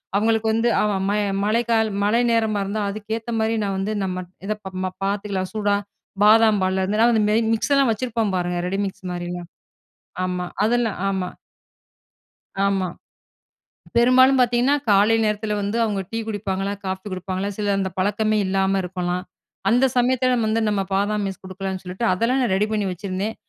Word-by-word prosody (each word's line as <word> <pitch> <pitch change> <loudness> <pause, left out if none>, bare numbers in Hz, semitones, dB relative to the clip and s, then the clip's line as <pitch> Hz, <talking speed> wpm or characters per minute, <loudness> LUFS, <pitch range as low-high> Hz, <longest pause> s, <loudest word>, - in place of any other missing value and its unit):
அவங்களுக்கு 220 +1 +2
வந்து 230 +1 +2
அவ 210 - +1 0.2
மய 210 +1 +1 0.2
மழைக்கா 230 +1 +2 0.3
மழை 225 +4 +3
நேரமா 220 -3 +1
இருந்தா 210 +2 -2
அதுக்கேத்த 220 +3 -5
மாரி 220 +1 +1
நான் 195 -1 -1
வந்து, 210 +3 -2
நம்ம 185 -1 -3 0.2
இத 215 - +1
ப 190 - -6
ம 185 - -2
பாத்துக்கலாம் 195 -2 -2
சூடா 205 -1 +1 0.5
பாதாம் 215 -2 +5
பால்ல 190 0 +1
இருந்து 210 +3 0
அந்த 215 -1 +3
மேரி, 225 +2 +3
மிக்ஸ்லாம் 275 +1 +2
வச்சிருப்போம் 225 -3 -1
பாருங்க 175 0 -1
ரெடி 195 +2 -2
மிக்ஸ் 190 -1 -9
மாரிலாம் 175 0 -5 0.8
ஆமா. 180 -1 -2 0.2
அதெல்லா 235 -2 +1 0.2
ஆமா. 190 -2 -2 1.4
ஆமா. 190 -2 0 1.1
பெரும்பாலும் 255 +2 +5
பாத்தீங்கன்னா 245 +4 +3
காலை 205 +3 +5
நேரத்துல 210 0 -1
வந்து 205 +3 -2
அவங்க 205 -3 -1
டீ 225 - -3
குடிப்பாங்களா? 200 -2 -2
காஃபி 190 +1 -4
குடிப்பாங்களா? 185 +2 -3
சில 205 -1 0
அந்த 190 -1 -1
பழக்கமே 215 +2 +1
இல்லாம 195 0 +1
இருக்கலாம். 180 0 -3 0.5
அந்த 245 +4 +4
சமயத்துல 255 0 +2
வந்து 225 +1 +1
நம்ம 200 -2 0
பாதாம் 205 +1 +1
மிக்ஸ் 190 - -7
கொடுக்கலான்னு 190 0 -5
சொல்லிட்டு, 185 +6 -4
அதெல்லாம் 230 +8 +1
நான் 220 -7 +1
ரெடி 210 +2 +1
பண்ணி 210 -2 0
வச்சிருந்தேன். 195 +3 -4
205 Hz, 155 wpm, -22 LUFS, 190-225 Hz, 1.4 s, பாதாம்